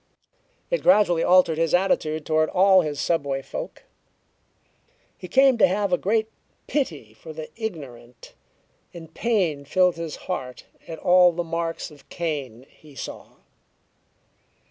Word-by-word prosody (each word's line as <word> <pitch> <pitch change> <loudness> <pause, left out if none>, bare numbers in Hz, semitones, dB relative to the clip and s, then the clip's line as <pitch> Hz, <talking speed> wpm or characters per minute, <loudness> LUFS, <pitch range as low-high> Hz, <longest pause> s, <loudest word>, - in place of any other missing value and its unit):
It - - 0
gradually 205 -10 +4
altered 175 -3 +4
his 165 +1 +2
attitude 155 -5 0
toward 155 0 +1
all 190 0 +5
his 150 -3 -4
subway 140 -5 -1
folk. - - -7 1.3
He 180 - -10
came 260 +5 +4
to - - +6
have 195 +1 -1
a - - +4
great 220 +2 0 0.4
pity 155 - -3
for 155 +8 -11
the 155 0 -8
ignorant, 135 - -8 0.6
and 165 -1 -11
pain 185 -11 0
filled 180 +4 +2
his 165 -2 -5
heart 130 -9 -6 0.2
at 165 - -7
all 180 0 +5
the 175 +1 -3
marks 165 -1 -4
of 145 -2 -18
Cain 140 -8 -5
he 150 -3 -19
saw. - - -8
165 Hz, 135 wpm, -24 LUFS, 150-185 Hz, 1.3 s, to